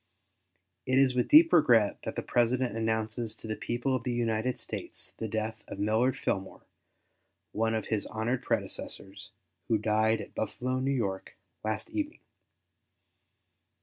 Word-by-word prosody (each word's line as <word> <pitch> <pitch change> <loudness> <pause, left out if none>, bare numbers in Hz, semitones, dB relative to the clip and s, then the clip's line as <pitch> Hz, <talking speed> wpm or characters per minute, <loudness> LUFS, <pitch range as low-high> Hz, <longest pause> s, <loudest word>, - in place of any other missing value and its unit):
It 130 0 +3
is 135 -1 +5
with 125 -1 +1
deep 325 +2 +8
regret 115 -9 +5
that - - -4
the - - -3
President 120 0 +1
announces 110 0 -1
to 110 - -12
the 110 0 -2
people 120 +4 -2
of 130 - -1
the 125 - -2
United 120 +1 0
States - - -6
the 110 - -5
death 110 +1 -3
of - - -7
Millard 110 +5 +2
Fillmore, 95 0 -3 0.9
one 110 +1 0
of 110 - -2
his 110 -2 -1
honored 115 +3 -1
predecessors, 95 -2 -4 0.4
who 115 - +3
died 110 +1 +2
at - - -8
Buffalo, 125 +4 -2
N.Y., 130 -8 0 0.4
last 110 0 -3
evening. 310 +1 -3
115 Hz, 145 wpm, -30 LUFS, 110-125 Hz, 0.9 s, deep